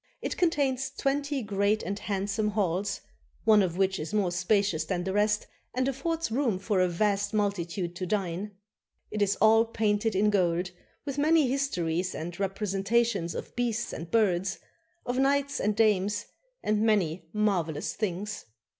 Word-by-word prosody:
It -, -, -3 dB
contains 275 Hz, -6 st, +1 dB
twenty 280 Hz, 0 st, -1 dB
great 205 Hz, +1 st, +1 dB
and 200 Hz, +1 st, -3 dB
handsome 205 Hz, +2 st, -1 dB
halls, 195 Hz, -1 st, -1 dB, 0.4 s
one 215 Hz, -2 st, +6 dB
of 180 Hz, -2 st, -1 dB
which 190 Hz, 0 st, +1 dB
is 160 Hz, +7 st, -4 dB
more 195 Hz, -4 st, +2 dB
spacious 180 Hz, -2 st, +1 dB
than 175 Hz, +2 st, -2 dB
the 190 Hz, +1 st, -2 dB
rest 210 Hz, +1 st, +2 dB, 0.3 s
and 255 Hz, +1 st, +1 dB
affords 325 Hz, +3 st, -2 dB
room 235 Hz, -5 st, +1 dB
for 200 Hz, 0 st, 0 dB
a 185 Hz, -, +4 dB
vast 200 Hz, +3 st, 0 dB
multitude 180 Hz, -4 st, -1 dB
to 185 Hz, -, -3 dB
dine. 195 Hz, +1 st, -2 dB, 0.6 s
It 210 Hz, -, -2 dB
is 205 Hz, 0 st, +3 dB
all 220 Hz, +2 st, +5 dB
painted 220 Hz, -2 st, 0 dB
in 210 Hz, +2 st, +3 dB
gold, 180 Hz, -2 st, +1 dB, 0.3 s
with 280 Hz, -1 st, -3 dB
many 310 Hz, -1 st, +4 dB
histories 180 Hz, -10 st, -1 dB
and 170 Hz, +3 st, -6 dB
representations 195 Hz, 0 st, 0 dB
of -, -, -7 dB
beasts 235 Hz, -1 st, -1 dB
and 165 Hz, +1 st, -6 dB
birds, 195 Hz, -4 st, +2 dB, 0.5 s
of 245 Hz, +1 st, -1 dB
knights 280 Hz, +1 st, +2 dB
and 210 Hz, 0 st, +1 dB
dames, 205 Hz, -2 st, +2 dB, 0.4 s
and 210 Hz, 0 st, +1 dB
many 185 Hz, -7 st, +1 dB
marvelous 180 Hz, -8 st, 0 dB
things. 205 Hz, 0 st, -3 dB
205 Hz, 155 wpm, -28 LUFS, 185-225 Hz, 0.6 s, one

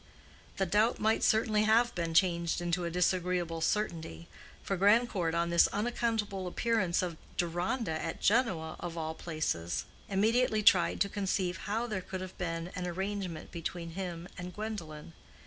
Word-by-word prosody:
The 195 Hz, -, +2 dB
doubt 210 Hz, +6 st, +2 dB
might 220 Hz, +1 st, +2 dB
certainly 220 Hz, -1 st, +3 dB
have 235 Hz, +3 st, +4 dB
been 165 Hz, -2 st, -2 dB
changed 170 Hz, -2 st, +3 dB
into 175 Hz, 0 st, -1 dB
a -, -, -1 dB
disagreeable 180 Hz, -1 st, 0 dB
certainty, 160 Hz, -, -2 dB, 0.4 s
for 195 Hz, -, -1 dB
Grandcourt 200 Hz, -4 st, +3 dB
on 170 Hz, 0 st, +1 dB
this 170 Hz, -, +6 dB
unaccountable 210 Hz, -3 st, -1 dB
appearance 185 Hz, -3 st, +1 dB
of 170 Hz, -3 st, -3 dB, 0.2 s
Deronda 175 Hz, +1 st, -1 dB
at 165 Hz, -, -4 dB
Genoa 190 Hz, -9 st, +1 dB
of 170 Hz, -1 st, -5 dB
all 160 Hz, -1 st, -2 dB
places, 85 Hz, -, -2 dB, 0.2 s
immediately 215 Hz, +2 st, +2 dB
tried 185 Hz, -3 st, +5 dB
to 200 Hz, -, +4 dB
conceive 190 Hz, -2 st, -1 dB
how 225 Hz, +3 st, 0 dB
there 210 Hz, -5 st, -3 dB
could 185 Hz, 0 st, -6 dB
have 185 Hz, 0 st, -7 dB
been 165 Hz, -1 st, -3 dB
an 180 Hz, -1 st, -3 dB
arrangement 190 Hz, -1 st, -4 dB
between 170 Hz, 0 st, -5 dB
him 175 Hz, -1 st, -5 dB
and 180 Hz, -1 st, -7 dB
Gwendolen. 170 Hz, -8 st, -6 dB
180 Hz, 150 wpm, -31 LUFS, 170-210 Hz, 0.4 s, this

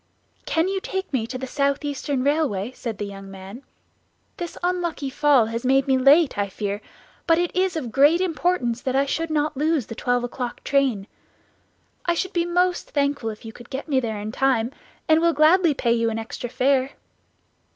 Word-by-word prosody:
"Can 325 Hz, +2 st, +1 dB
you 385 Hz, 0 st, -1 dB
take 380 Hz, -4 st, -4 dB
me 230 Hz, -4 st, 0 dB
to 255 Hz, +2 st, -5 dB
the 260 Hz, -, -5 dB
South 280 Hz, +2 st, 0 dB
Eastern 280 Hz, -2 st, -2 dB
Railway?" 275 Hz, -8 st, 0 dB
said 235 Hz, -4 st, -6 dB
the 205 Hz, -, -3 dB
young 195 Hz, -1 st, -9 dB
man; 195 Hz, +5 st, -10 dB, 0.8 s
"this 345 Hz, -1 st, -6 dB
unlucky 345 Hz, -6 st, -1 dB
fall 280 Hz, -4 st, +4 dB
has 230 Hz, +1 st, -4 dB
made 270 Hz, +1 st, +3 dB
me 265 Hz, -, +4 dB
late, 275 Hz, -1 st, +4 dB
I 200 Hz, -1 st, 0 dB
fear; 205 Hz, +1 st, -4 dB, 0.5 s
but 330 Hz, -1 st, +5 dB
it 350 Hz, 0 st, -1 dB
is 370 Hz, -1 st, +1 dB
of 255 Hz, -8 st, -4 dB
great 290 Hz, +7 st, +5 dB
importance 330 Hz, -9 st, 0 dB
that 260 Hz, -1 st, -2 dB
I 275 Hz, +1 st, +3 dB
should 330 Hz, +4 st, -2 dB
not 305 Hz, -1 st, 0 dB
lose 300 Hz, -2 st, +1 dB
the 225 Hz, -, -7 dB
twelve 245 Hz, +1 st, 0 dB
o'clock 245 Hz, 0 st, -5 dB
train. 265 Hz, -8 st, +1 dB, 1.0 s
I 345 Hz, -, +1 dB
should 375 Hz, +3 st, -2 dB
be 345 Hz, -1 st, 0 dB
most 355 Hz, +1 st, +1 dB
thankful 280 Hz, -5 st, 0 dB
if 215 Hz, +1 st, -9 dB
you 225 Hz, -, -8 dB
could 240 Hz, +1 st, -14 dB
get 265 Hz, +4 st, -5 dB
me 275 Hz, -4 st, +2 dB
there 220 Hz, -4 st, -3 dB
in 210 Hz, +1 st, -5 dB
time, 250 Hz, -2 st, +1 dB, 0.4 s
and 315 Hz, 0 st, +4 dB
will 335 Hz, 0 st, +3 dB
gladly 315 Hz, +1 st, +4 dB
pay 235 Hz, -3 st, +1 dB
you 230 Hz, -1 st, +1 dB
an 225 Hz, -, -3 dB
extra 225 Hz, +2 st, -5 dB
fare." 265 Hz, +2 st, +1 dB
270 Hz, 195 wpm, -23 LUFS, 235-320 Hz, 1.0 s, but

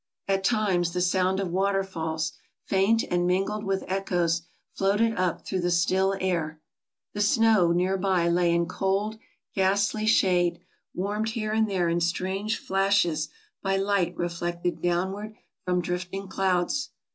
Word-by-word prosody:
At 195 Hz, -1 st, +1 dB
times 190 Hz, -6 st, +1 dB
the 180 Hz, -, -1 dB
sound 185 Hz, +1 st, +2 dB
of 190 Hz, -3 st, -2 dB
water 195 Hz, +1 st, +1 dB
falls, 160 Hz, -3 st, -3 dB, 0.3 s
faint 200 Hz, +4 st, +2 dB
and 175 Hz, 0 st, +2 dB
mingled 195 Hz, +4 st, 0 dB
with 195 Hz, -1 st, -1 dB
echoes, 175 Hz, -3 st, 0 dB, 0.3 s
floated 210 Hz, +4 st, +1 dB
up 180 Hz, -1 st, -1 dB
through 190 Hz, -, -2 dB
the 175 Hz, -, 0 dB
still 190 Hz, +3 st, +2 dB
air. 165 Hz, -4 st, -1 dB, 0.5 s
The 205 Hz, -, -2 dB
snow 215 Hz, -4 st, +4 dB
near 180 Hz, +3 st, +1 dB
by 185 Hz, -3 st, +1 dB
lay 170 Hz, 0 st, +3 dB
in 170 Hz, 0 st, +2 dB
cold, 200 Hz, +5 st, -1 dB, 0.3 s
ghastly 205 Hz, +3 st, +1 dB
shade, 175 Hz, -5 st, +3 dB, 0.4 s
warmed 210 Hz, +4 st, -1 dB
here 215 Hz, -1 st, -3 dB
and 220 Hz, 0 st, +2 dB
there 185 Hz, -3 st, +1 dB
in 170 Hz, +1 st, 0 dB
strange 190 Hz, +5 st, -1 dB
flashes 195 Hz, -6 st, +1 dB, 0.3 s
by 195 Hz, 0 st, 0 dB
light 195 Hz, -3 st, 0 dB
reflected 175 Hz, 0 st, -2 dB
downward 190 Hz, +5 st, -1 dB, 0.3 s
from 180 Hz, -1 st, +1 dB
drifting 180 Hz, +3 st, -4 dB
clouds. 190 Hz, +8 st, 0 dB
190 Hz, 145 wpm, -26 LUFS, 175-200 Hz, 0.5 s, snow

